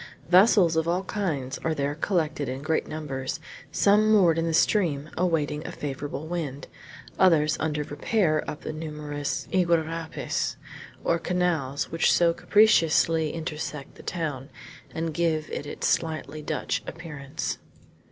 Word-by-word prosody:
Vessels 180 Hz, -2 st, +6 dB
of 160 Hz, 0 st, +1 dB
all 180 Hz, +3 st, +1 dB
kinds 155 Hz, -11 st, -3 dB
are 160 Hz, -1 st, -1 dB
there 140 Hz, 0 st, -1 dB
collected 155 Hz, -4 st, -1 dB
in 130 Hz, +2 st, -5 dB
great 160 Hz, +1 st, 0 dB
numbers, 140 Hz, -3 st, -4 dB, 0.3 s
some 210 Hz, +2 st, +4 dB
moored 175 Hz, -6 st, +5 dB
in 165 Hz, -, 0 dB
the 165 Hz, -, -1 dB
stream 155 Hz, -7 st, +2 dB
awaiting 160 Hz, -4 st, 0 dB
a -, -, -5 dB
favorable 145 Hz, +1 st, -5 dB
wind, 155 Hz, -5 st, -4 dB, 0.5 s
others 155 Hz, -5 st, +5 dB
under 150 Hz, -1 st, -1 dB
repair 155 Hz, +2 st, +1 dB
up 150 Hz, -, -6 dB
the -, -, -5 dB
numerous 150 Hz, -2 st, -4 dB
iguarapes, 165 Hz, -2 st, 0 dB, 0.5 s
or 170 Hz, -, +2 dB
canals, 165 Hz, -6 st, -1 dB
which 165 Hz, -, +3 dB
so 170 Hz, -1 st, +4 dB
capriciously 165 Hz, -6 st, +4 dB
intersect 155 Hz, -3 st, -5 dB
the -, -, -13 dB
town, 150 Hz, -6 st, -4 dB, 0.4 s
and 165 Hz, 0 st, -3 dB
give 160 Hz, -2 st, 0 dB
it 145 Hz, -, -4 dB
its -, -, -4 dB
slightly 155 Hz, -2 st, -1 dB
Dutch 150 Hz, -, -2 dB
appearance. 150 Hz, -4 st, -5 dB
160 Hz, 135 wpm, -26 LUFS, 150-170 Hz, 0.5 s, Vessels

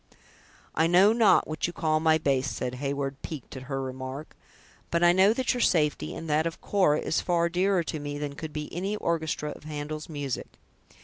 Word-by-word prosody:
"I 160 Hz, +1 st, +3 dB
know 185 Hz, +5 st, +6 dB
not 225 Hz, -4 st, +4 dB
what 155 Hz, +2 st, -2 dB
you 175 Hz, -, -6 dB
call 155 Hz, -2 st, +1 dB
my 160 Hz, 0 st, +4 dB
bass," 135 Hz, -4 st, +1 dB
said 125 Hz, -, -3 dB
Heyward, 140 Hz, -1 st, -3 dB
piqued 150 Hz, -5 st, -7 dB
at 130 Hz, -, -6 dB
her 135 Hz, -1 st, -2 dB
remark, 130 Hz, +3 st, -6 dB, 0.5 s
"but 170 Hz, 0 st, +1 dB
I 175 Hz, -, +7 dB
know 190 Hz, +3 st, +5 dB
that 255 Hz, +3 st, 0 dB
your 245 Hz, -, -2 dB
safety, 150 Hz, -, +1 dB
and 165 Hz, -, -7 dB
that 155 Hz, +2 st, +2 dB
of 165 Hz, -, -6 dB
Cora, 185 Hz, -7 st, +2 dB
is -, -, 0 dB
far 170 Hz, -1 st, +1 dB
dearer 180 Hz, +1 st, +2 dB
to 155 Hz, -, -4 dB
me 145 Hz, 0 st, -5 dB
than 145 Hz, -1 st, -4 dB
could 155 Hz, +2 st, -7 dB
be 150 Hz, 0 st, -4 dB
any 195 Hz, +4 st, -2 dB
orchestra 160 Hz, -5 st, -2 dB
of -, -, -11 dB
Handel's 150 Hz, +1 st, -5 dB
music." 145 Hz, -4 st, -4 dB
155 Hz, 200 wpm, -27 LUFS, 145-175 Hz, 0.5 s, I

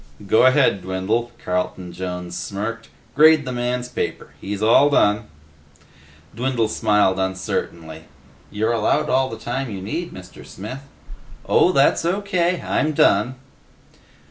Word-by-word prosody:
"Go 110 Hz, +6 st, +5 dB
ahead, 130 Hz, -7 st, +3 dB
Dwindle," 95 Hz, +6 st, -2 dB, 0.2 s
Carlton 90 Hz, 0 st, -3 dB
Jones 90 Hz, -1 st, -6 dB
smirked. 105 Hz, +5 st, -5 dB, 0.2 s
"Grade 155 Hz, 0 st, +5 dB
the 130 Hz, -, -4 dB
man's 125 Hz, 0 st, -2 dB
paper. -, -, -4 dB
He's 100 Hz, +1 st, -4 dB
all 120 Hz, +6 st, +5 dB
done." 105 Hz, -6 st, +2 dB, 1.1 s
Dwindle 120 Hz, -2 st, 0 dB
smiled 105 Hz, -3 st, +2 dB
uncertainly. 85 Hz, -4 st, -4 dB, 0.4 s
"You're 110 Hz, +3 st, -1 dB
allowed 110 Hz, -2 st, +1 dB
all 130 Hz, 0 st, +2 dB
the -, -, -7 dB
time 130 Hz, +2 st, -4 dB
you 100 Hz, -3 st, -6 dB
need, 165 Hz, -, -4 dB
Mr. 90 Hz, -1 st, -12 dB
Smith." 120 Hz, +8 st, -8 dB, 0.7 s
"Oh, 180 Hz, -, +4 dB
that's 140 Hz, -1 st, +3 dB
O.K. 180 Hz, -1 st, 0 dB
I'm 155 Hz, 0 st, 0 dB
done." 120 Hz, -1 st, +3 dB
110 Hz, 125 wpm, -21 LUFS, 95-135 Hz, 1.1 s, Go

